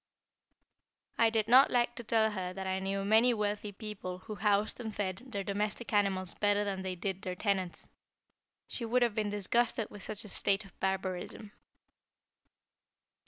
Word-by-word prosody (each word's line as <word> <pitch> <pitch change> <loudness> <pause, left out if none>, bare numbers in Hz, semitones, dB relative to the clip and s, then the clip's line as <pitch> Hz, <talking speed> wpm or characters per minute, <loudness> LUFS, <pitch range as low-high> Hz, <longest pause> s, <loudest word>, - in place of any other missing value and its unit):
I 230 - +6
did 220 -1 0
not 255 +4 +7
like 240 -1 +2
to 235 - -7
tell 220 -1 +3
her 185 -3 -4
that 190 0 -5
I 190 0 -1
knew 195 +1 -2
many 225 +4 +5
wealthy 210 0 -2
people 200 -3 -6
who 215 +4 -8
housed 205 +2 +1
and 220 -3 -5
fed 190 0 -2
their 200 -6 -3
domestic 210 +3 -3
animals 195 -3 +1
better 205 0 +2
than 195 -2 -2
they 190 -1 -3
did 190 +1 -3
their 185 -1 -4
tenants. 190 -3 -1 0.8
She 240 - -4
would 245 +2 +2
have 235 -3 +1
been 210 -1 -1
disgusted 225 +3 0
with 205 - -10
such 210 +1 -4
a - - -8
state 195 +1 +2
of 195 - -18
barbarism. 190 +2 -3
205 Hz, 165 wpm, -32 LUFS, 190-220 Hz, 0.8 s, not